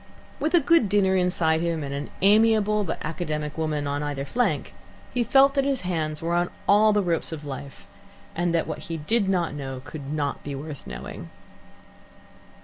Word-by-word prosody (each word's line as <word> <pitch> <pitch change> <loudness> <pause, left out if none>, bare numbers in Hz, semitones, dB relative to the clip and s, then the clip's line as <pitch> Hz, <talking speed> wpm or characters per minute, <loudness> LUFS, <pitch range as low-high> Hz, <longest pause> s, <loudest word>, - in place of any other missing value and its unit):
With 310 +4 +1
a - - +7
good 325 - +3
dinner 190 -2 +3
inside 170 -3 +2
him 165 -2 -1
and 140 0 -4
an 140 +1 -4
amiable 210 0 +4
but 170 - -3
academic 150 -2 -3
woman 155 -2 -1
on 145 0 -2
either 145 -2 -3
flank, 245 - -1 0.4
he 245 - +1
felt 275 +3 +5
that 275 -1 +2
his 275 -1 0
hands 160 -4 -2
were 170 +1 -1
on 175 0 +1 0.2
all 215 +2 +6
the 205 -1 +2
ropes 170 -2 0
of 155 -2 -6
life, 140 -1 -8 0.5
and 175 +1 0
that 165 - +1
what - - -5
he 165 - -2
did 200 +6 +1
not 175 -5 0
know 135 -3 -5
could 145 -2 -7
not 145 -2 -2
be 145 -1 -5
worth 145 +1 -8
knowing. - - -8
165 Hz, 185 wpm, -25 LUFS, 150-205 Hz, 0.5 s, a